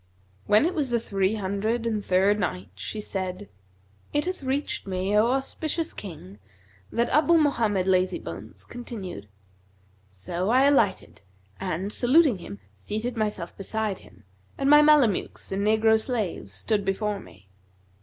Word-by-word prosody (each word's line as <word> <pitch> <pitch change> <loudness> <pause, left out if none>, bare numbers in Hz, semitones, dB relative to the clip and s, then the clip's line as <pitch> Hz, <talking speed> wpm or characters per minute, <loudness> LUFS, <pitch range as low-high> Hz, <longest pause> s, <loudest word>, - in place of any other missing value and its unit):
When 210 +7 +5
it 350 - 0
was 295 -7 -1
the 240 -1 +1
Three 195 -2 0
Hundred 215 +4 -1
and 215 -3 -1
Third 195 +3 +3
Night, 95 - -3
She 100 - -6
said, 190 -1 -5 0.6
It 295 0 +1
hath 370 -2 -3
reached 270 -4 -2
me, 190 +2 -1
O 215 +2 +5
auspicious 310 +5 -2
King, 125 - -9 0.5
that 235 +1 +1
Abu 315 +4 +4
Mohammed 230 - +2
Lazybones 185 -1 -1
continued: 200 - -7 0.8
"So 170 - -3
I 255 +3 +5
alighted 275 -8 +2 0.4
and, 190 +2 -3
saluting 260 - +4
him, 100 -11 -9 0.2
seated 215 - -4
myself 210 -6 -3
beside 210 0 -3
him, 95 +3 -19 0.3
and 275 +1 +2
my 295 0 +9
Mamelukes 295 -10 +3
and 195 +1 -1
negro 220 0 +4
slaves 220 -7 -3
stood 215 -2 -1
before 200 +1 -1
me. 95 - -16
210 Hz, 140 wpm, -26 LUFS, 190-245 Hz, 0.8 s, my